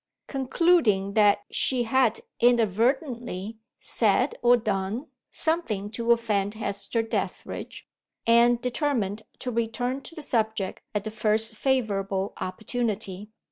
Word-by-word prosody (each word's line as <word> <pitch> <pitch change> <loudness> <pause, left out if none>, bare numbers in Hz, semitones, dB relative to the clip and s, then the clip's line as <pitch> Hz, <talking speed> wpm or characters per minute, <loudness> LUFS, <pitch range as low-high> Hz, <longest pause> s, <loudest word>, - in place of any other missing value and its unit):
Concluding 265 - +2
that 205 -1 +4
she 255 -2 +1
had 235 -1 +2 0.2
inadvertently 235 - +1 0.2
said, 235 +5 +1
or 245 0 +6
done, 215 +2 -2 0.2
something 235 - -1
to 235 +1 0
offend 210 -3 +1
Hester 200 +1 -2
Dethridge, 225 - -5 0.4
Anne 235 +1 +5
determined 240 -4 -1 0.2
to 250 - -4
return 245 +3 -1
to 330 - -11
the 310 - -5
subject 220 -7 -1
at 205 - 0
the 215 - -5
first 220 +1 +2
favorable 200 -7 0
opportunity. 210 -1 -3
225 Hz, 110 wpm, -26 LUFS, 205-245 Hz, 0.4 s, or